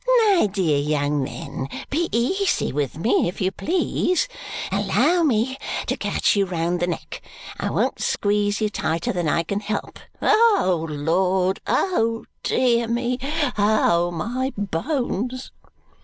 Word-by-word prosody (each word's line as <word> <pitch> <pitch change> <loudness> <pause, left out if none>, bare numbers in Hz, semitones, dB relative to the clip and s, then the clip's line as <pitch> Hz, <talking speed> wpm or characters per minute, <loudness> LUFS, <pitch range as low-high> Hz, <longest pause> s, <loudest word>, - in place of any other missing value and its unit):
My 340 - +3
dear 170 -8 +1
young 145 0 0
men, 130 0 -5 0.2
be 335 +4 0
easy 370 - +1
with 145 0 -2
me, 180 +2 +2
if 175 - -5
you 185 0 +1
please. 365 - 0 0.4
Allow 355 0 +2
me 260 -2 +1 0.3
to - - -1
catch - - +1
you 200 -1 +2
round 175 0 -1
the 175 - 0
neck. 175 - -5 0.4
I - - -1
won't - - 0
squeeze 205 0 0
you 215 - +1
tighter 160 -2 -1
than 175 -4 0
I 165 - +1
can 200 +5 -2
help. 210 0 -4 0.2
Oh, 190 - +3
Lord! 180 +5 +1
Oh, 230 -12 +1 0.2
dear 235 -2 +2
me! 240 +2 -1 0.4
Oh, 190 -5 +3
my 235 +10 -2
bones!" 245 - -2
205 Hz, 135 wpm, -23 LUFS, 170-250 Hz, 0.4 s, My